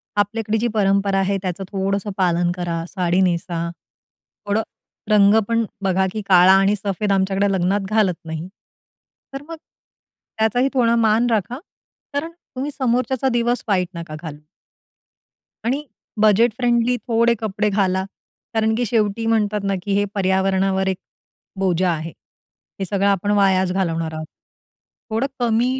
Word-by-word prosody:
आपल्याकडे 215 Hz, +2 st, 0 dB
जी 235 Hz, -, 0 dB
परंपरा 195 Hz, -1 st, +2 dB
आहे 195 Hz, +1 st, +1 dB
त्याचं 185 Hz, 0 st, -4 dB
थोडंसं 195 Hz, +1 st, -1 dB
पालन 175 Hz, -2 st, +2 dB
करा. 170 Hz, -2 st, -3 dB
साडी 180 Hz, 0 st, 0 dB
नेसा. 170 Hz, -1 st, -1 dB, 0.8 s
थोडं 210 Hz, +2 st, +1 dB, 0.5 s
रंग 205 Hz, 0 st, +5 dB
पण 230 Hz, 0 st, +1 dB, 0.2 s
बघा, 190 Hz, 0 st, +2 dB
की 215 Hz, -, -3 dB
काळा 185 Hz, 0 st, +7 dB
आणि 195 Hz, +2 st, +4 dB
सफेद 200 Hz, 0 st, -2 dB
आमच्याकडे 195 Hz, +1 st, +1 dB
लग्नात 190 Hz, +2 st, +1 dB
घालत 210 Hz, -5 st, +1 dB
नाही. 160 Hz, +2 st, -5 dB, 0.9 s
तर 275 Hz, -, -5 dB
मग 330 Hz, -, -5 dB, 0.8 s
त्याचाही 245 Hz, +5 st, +2 dB
थोडा 235 Hz, -3 st, +3 dB
मान 225 Hz, +1 st, +3 dB
राखा, 230 Hz, +4 st, -1 dB, 0.5 s
कारण 300 Hz, +4 st, -2 dB, 0.2 s
तुम्ही 275 Hz, +3 st, -3 dB
समोरच्याचा 255 Hz, 0 st, 0 dB
दिवस 240 Hz, +1 st, 0 dB
वाईट 185 Hz, -4 st, +1 dB
नका 165 Hz, -2 st, -6 dB
घालू. 150 Hz, -3 st, -8 dB, 1.3 s
आणि 275 Hz, +5 st, 0 dB, 0.4 s
बजेट 220 Hz, +2 st, +4 dB
फ्रेंडली 240 Hz, 0 st, +2 dB
थोडे 235 Hz, 0 st, +3 dB
कपडे 210 Hz, -1 st, -1 dB
घाला. 190 Hz, -2 st, +1 dB, 0.5 s
कारण 220 Hz, 0 st, +2 dB
की 245 Hz, +1 st, 0 dB
शेवटी 220 Hz, 0 st, 0 dB
म्हणतात 215 Hz, -2 st, +1 dB
ना, 195 Hz, 0 st, 0 dB
की 200 Hz, -, -1 dB
हे 205 Hz, -, +2 dB
पर्यावरणावर 190 Hz, 0 st, +1 dB
एक 190 Hz, -1 st, 0 dB, 0.6 s
बोजा 185 Hz, -1 st, +1 dB
आहे. 160 Hz, 0 st, -3 dB, 0.7 s
हे 195 Hz, -, -1 dB
सगळं 200 Hz, +2 st, 0 dB
आपण 200 Hz, +1 st, +1 dB
वायाच 190 Hz, -2 st, +3 dB
घालवणार 165 Hz, -4 st, -1 dB
आहोत. 155 Hz, 0 st, -5 dB, 0.8 s
थोडं 225 Hz, +5 st, 0 dB
कमी 240 Hz, +2 st, +1 dB
200 Hz, 140 wpm, -21 LUFS, 190-225 Hz, 1.3 s, काळा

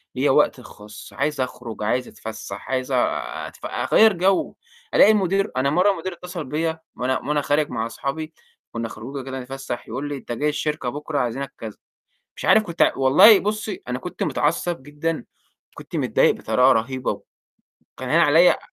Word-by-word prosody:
ليّا -, -, +2 dB
وقتي -, -, +3 dB
الخاص 105 Hz, 0 st, -12 dB
عايز 145 Hz, 0 st, -1 dB
أخرج، 120 Hz, -4 st, -5 dB
عايز 125 Hz, +4 st, 0 dB
أتفسّح، 105 Hz, -3 st, -8 dB
عايز 130 Hz, 0 st, -1 dB
أتف 125 Hz, -1 st, -2 dB
أغيّر 220 Hz, -1 st, +4 dB
جَو، 190 Hz, +2 st, +1 dB, 0.4 s
ألاقي 215 Hz, -, +7 dB
المدير 195 Hz, -1 st, +1 dB
أنا 140 Hz, +2 st, +2 dB
مرّة 180 Hz, +7 st, +4 dB
المدير 185 Hz, 0 st, -4 dB
اتّصل 180 Hz, -2 st, -7 dB
بيّا 160 Hz, +4 st, -2 dB, 0.2 s
وأنا 130 Hz, +1 st, -1 dB
وأنا 150 Hz, +1 st, -1 dB
خارج 145 Hz, +1 st, +1 dB
مع 115 Hz, -2 st, -2 dB
أصحابي، 140 Hz, +7 st, -5 dB, 0.4 s
كُنّا 115 Hz, 0 st, -4 dB
خروجة 130 Hz, +5 st, -7 dB
كده 135 Hz, 0 st, -5 dB
بنتفسّح، 130 Hz, -1 st, -6 dB
يقول 135 Hz, +6 st, -4 dB
لي: 145 Hz, -, -4 dB
"أنت 125 Hz, -, -9 dB
جاي 145 Hz, +6 st, 0 dB
الشركة 150 Hz, -3 st, -2 dB
بكره، 145 Hz, +2 st, -3 dB
عايزينك،" 135 Hz, +2 st, -3 dB
كذا. 110 Hz, -2 st, -8 dB, 0.6 s
مش -, -, -6 dB
عارف 220 Hz, -, +5 dB
كنت 170 Hz, -4 st, +2 dB
والله 140 Hz, +11 st, +7 dB
بُصّي، 210 Hz, -1 st, -3 dB
أنا 125 Hz, 0 st, -3 dB
كنت 180 Hz, -, -5 dB
متعصب 165 Hz, 0 st, -1 dB
جدًا، 150 Hz, +3 st, -3 dB, 0.5 s
كنت -, -, -10 dB
متضايق -, -, +3 dB
بطريقة 130 Hz, +1 st, +3 dB
رهيبة، 130 Hz, +2 st, -1 dB, 0.8 s
وكان -, -, -6 dB
هاين -, -, +4 dB
عليّا -, -, +6 dB
آآ -, -, -4 dB
140 Hz, 165 wpm, -22 LUFS, 125-165 Hz, 0.8 s, ألاقي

